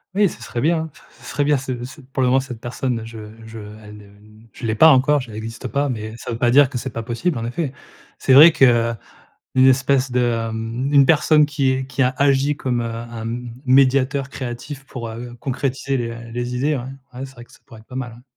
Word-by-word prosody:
Oui, 205 -2 +4
ce - - -11
serait 120 0 -4
bien, 165 +3 +2
hein, 160 0 -4
c - - -19 0.2
ce - - -15
serait 145 - 0
bien 145 -1 +3
ce 130 -2 -5
ce 130 +4 -11
pour 130 0 -4
le 125 - +3
moment 130 - +4
cette 125 -4 -7
personne 120 -1 -3
je 115 0 -10 0.3
je 115 0 -10 0.3
elle 105 0 -11
ne, 105 - -13
heu 100 - -18 0.4
je - - -14
l'ai 110 - 0
pas 160 +8 +7
encore, 145 +1 +4
j 120 -3 -10
elle 105 - -8
existe 115 +1 -6
pas, 140 0 -1
mais 110 -2 -5
ça - - -9
veut 115 - -3
pas 120 0 +2
dire 140 +1 +6
que 135 - -4
c'est 125 +2 -5
pas 115 - -4
possible, 120 +8 -2
en 115 - -4
effet. 140 +3 -3 0.5
C'est 130 - +3
vrai 155 +5 +10
qu'une 135 -6 +5 0.8
espèce 130 0 +3
de 120 -2 0
mmh, 115 +5 -3
une 140 -1 +7
personne 150 -1 +4
qui 135 -3 0
qui 135 +1 0
a 125 +1 +1
agi 140 +1 +2
comme, 125 -4 -2
heu, - - -2
un 115 0 -6
m 120 +1 -5 0.2
médiateur 135 +1 +3
créatif 135 +2 -7
pour, 120 -4 -7
heu, 120 +2 -8
concrétiser 135 +1 -2
les, 120 -1 -2
heu, 115 0 -9
les 120 +1 -3
idées, 145 +4 0
ouais. 120 - -4 0.4
Ouais, 135 - -4
c'est 135 - -13
vrai 120 -1 -12
que - - -25
ça - - -17
pourrait 115 -4 -14
être 110 - -20
pas 130 - -11
mal, 125 -3 -4
ouais. 120 +2 -15
130 Hz, 250 wpm, -20 LUFS, 120-140 Hz, 0.8 s, vrai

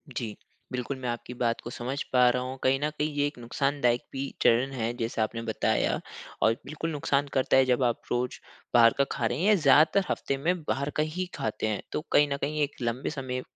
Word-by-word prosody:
जी। 110 -3 -3 0.4
बिल्कुल 125 +1 -3
मैं 125 - -4
आपकी 120 +1 -5
बात 120 -1 -1
को - - -7
समझ 130 +4 -4
पा 125 -1 +6
रहा 125 +1 0
हूँ, 130 +1 -5
कहीं 135 +1 +3
न 150 +2 0
कहीं 150 0 -1
ये 145 0 +2
एक 145 - -8
नुकसानदायक 125 0 0
भी 135 0 -3 0.2
चरण 125 +4 +4
है 115 -2 -2
जैसा 115 -2 -1
आपने 115 +1 -3
बताया। 115 -1 0 0.4
और 110 - +5
बिल्कुल 155 +4 -4
नुकसान 145 -1 0
करता 130 0 +3
है, 130 - +6
जब 125 0 +2
आप 120 -2 +1
रोज़ 125 +1 -1 0.3
बाहर 115 -1 +7
का 140 - +4
खा - - -1
रहे 120 - 0
हैं, 180 - 0
या 215 - +6
ज़्यादातर 155 +3 +5
हफ़्ते 135 - -1
में 170 +4 0
बाहर 140 -1 -1
का - - +4
ही 165 +4 -3
खाते 110 0 -2
हैं। 105 -1 -1
तो - - -2
कहीं 145 - +5
न 140 - -2
कहीं 150 +1 -1
एक 145 - -3
लंबे 120 +2 -1
समय 130 -4 -4
130 Hz, 225 wpm, -28 LUFS, 120-145 Hz, 0.4 s, बाहर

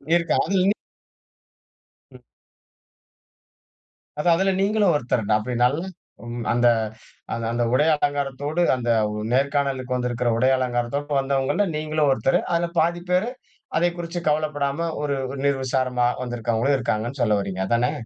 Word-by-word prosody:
இருக்கு 170 -2 +1
அதுல 195 - +1
இன்னி 200 +2 +3 1.4
ம். - - -15 2.0
அதான். 170 +2 +4
அதுல 195 +1 +2
நீங்களும் 205 -2 +3
ஒருத்தர்தா 115 -5 0
அப்டி 125 +4 -4
நல்ல 140 +6 +1 0.7
அந்த 120 0 +3 0.8
அந்த 120 0 0
உடைய 150 +5 +4
அலங்காரத்தோடு, 145 +2 -1
அந்த 120 -2 -3 0.4
நேர்காணலுக்கு 135 -1 0
வந்திருக்கிற 125 -1 -1
உடைய 130 +3 +3
அலங்காரத்தோடு 130 +3 -1
வந்தவங்கள்ல 135 +8 +1
நீங்களும் 155 -1 0
ஒருத்தர். 135 +1 +2
அதுல 170 0 +1
பாதி 170 +2 +1
பேரு 185 +6 +2 0.5
அதைக் 175 +1 +1
குறிச்சு 175 0 -4
கவலைப்படாம 150 +1 -1
ஒரு 145 -1 -1 0.3
நிர்விசாரமா 130 -2 +1 0.2
வந்திருக்கவங்களும் 120 +2 0
இருக்காங்கன்னு 115 +4 -2
சொல்ல 105 -3 +3
வர்றீங்க, 95 -1 -4
அதானே? 120 +4 +2
140 Hz, 115 wpm, -23 LUFS, 125-155 Hz, 2.0 s, அதான்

